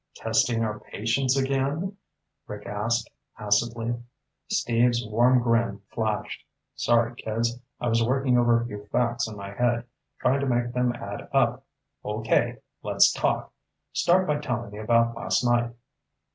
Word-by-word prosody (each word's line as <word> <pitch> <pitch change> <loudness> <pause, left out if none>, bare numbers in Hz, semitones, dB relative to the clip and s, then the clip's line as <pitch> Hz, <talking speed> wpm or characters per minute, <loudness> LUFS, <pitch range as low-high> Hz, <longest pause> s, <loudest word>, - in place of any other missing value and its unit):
"Testing 115 +1 +1
our 105 -1 -2
patience 125 +5 0
again?" 140 +8 0 0.5
Rick 105 0 -8
asked 115 +3 -1 0.3
acidly. 115 +3 0 0.5
Steve's 120 0 +2
warm 120 +3 +3
grin 115 -4 +1
flashed. 110 -2 -2 0.3
"Sorry, 120 0 +2
kids. 115 +2 -2 0.2
I 120 - -2
was 115 0 +3
working 130 +1 +2
over 120 -1 +4
a 115 - -3
few 105 -3 -8
facts 120 0 0
in 110 -1 -8
my 100 0 -7
head, 120 +2 +1 0.3
trying 135 +2 +2
to 140 - -1
make 120 -1 0
them 125 0 +2
add 100 -4 -7
up. 130 -1 +2 0.4
Okay, 110 +1 0 0.2
let's - - +4
talk. - - -1 0.4
Start 185 +2 +3
by 150 -2 0
telling 120 -6 -3
me 105 - -8
about 115 +1 +2
last 125 - 0
night." 120 0 +2
120 Hz, 145 wpm, -26 LUFS, 115-125 Hz, 0.5 s, over